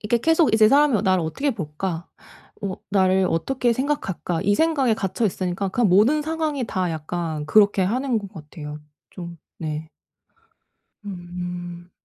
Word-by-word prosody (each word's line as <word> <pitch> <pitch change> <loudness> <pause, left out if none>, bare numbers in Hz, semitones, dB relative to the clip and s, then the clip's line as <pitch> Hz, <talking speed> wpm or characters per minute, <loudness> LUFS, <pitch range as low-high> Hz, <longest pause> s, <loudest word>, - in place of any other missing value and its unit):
이렇게 230 +3 +1
계속 325 0 +3
이제 220 -1 +6
이 - - +5
사람이 285 -2 +5
'어 - - +1
나를 185 -3 +2
어떻게 275 - -1
볼까? 170 - -4 0.5
어 190 -2 -2 0.2
나를 190 -1 +3
어떻게 240 +8 +1
생각할까?' 230 - -2
이 205 +1 +3
생각에 290 -7 +2
갇혀 215 +1 -1
있으니까 185 +1 -2
그냥 230 +2 +2
모든 225 +12 +4
상황이 310 -5 -2
다 185 -3 -1
약간 160 -1 -4
그렇게 205 +2 +4
하는 245 +4 0
것 200 -2 -9
같아요. 150 -1 -9 0.3
좀 170 -2 -8 0.2
네. 155 -1 -4 1.2
음. 175 -1 -7
190 Hz, 305 characters per minute, -23 LUFS, 175-240 Hz, 1.2 s, 이제